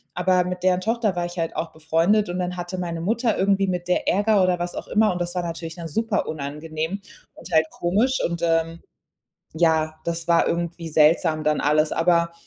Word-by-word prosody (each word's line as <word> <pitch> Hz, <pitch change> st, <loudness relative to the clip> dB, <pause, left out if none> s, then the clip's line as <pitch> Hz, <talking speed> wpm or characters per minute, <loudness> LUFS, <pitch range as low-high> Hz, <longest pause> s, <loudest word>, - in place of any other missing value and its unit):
Aber 180 Hz, 0 st, +2 dB
mit 180 Hz, 0 st, -5 dB
deren 185 Hz, 0 st, +3 dB
Tochter 220 Hz, -1 st, 0 dB
war 175 Hz, 0 st, -1 dB
ich 175 Hz, +1 st, -8 dB
halt 165 Hz, -1 st, -2 dB
auch 165 Hz, 0 st, -3 dB
befreundet, 165 Hz, +6 st, +1 dB
und 180 Hz, +1 st, -3 dB
dann 180 Hz, 0 st, -3 dB
hatte 175 Hz, +1 st, -5 dB
meine 170 Hz, -2 st, -3 dB
Mutter 225 Hz, +4 st, 0 dB
irgendwie 195 Hz, 0 st, +2 dB
mit 180 Hz, -1 st, -3 dB
der 180 Hz, -, 0 dB
Ärger 205 Hz, +1 st, +3 dB
oder 180 Hz, -1 st, +1 dB
was 175 Hz, 0 st, -4 dB
auch -, -, -6 dB
immer, 215 Hz, 0 st, +3 dB
und 175 Hz, -, -4 dB
das 175 Hz, 0 st, -3 dB
war 180 Hz, -, -1 dB
natürlich 165 Hz, -1 st, -5 dB
dann 170 Hz, -2 st, -6 dB
super 220 Hz, +6 st, -1 dB
unangenehm 155 Hz, +4 st, -4 dB, 0.4 s
und -, -, -12 dB
halt 160 Hz, -1 st, +4 dB
komisch. 220 Hz, +10 st, +1 dB
Und, 170 Hz, 0 st, -5 dB
ähm, 165 Hz, 0 st, 0 dB, 0.7 s
ja, 160 Hz, -1 st, +1 dB
das 170 Hz, 0 st, -3 dB
war 170 Hz, -1 st, +4 dB
irgendwie 170 Hz, 0 st, -3 dB
seltsam 155 Hz, 0 st, +3 dB
dann 150 Hz, 0 st, +1 dB
alles. 155 Hz, +1 st, +2 dB
Aber, 170 Hz, 0 st, +2 dB
175 Hz, 200 wpm, -23 LUFS, 165-185 Hz, 0.7 s, halt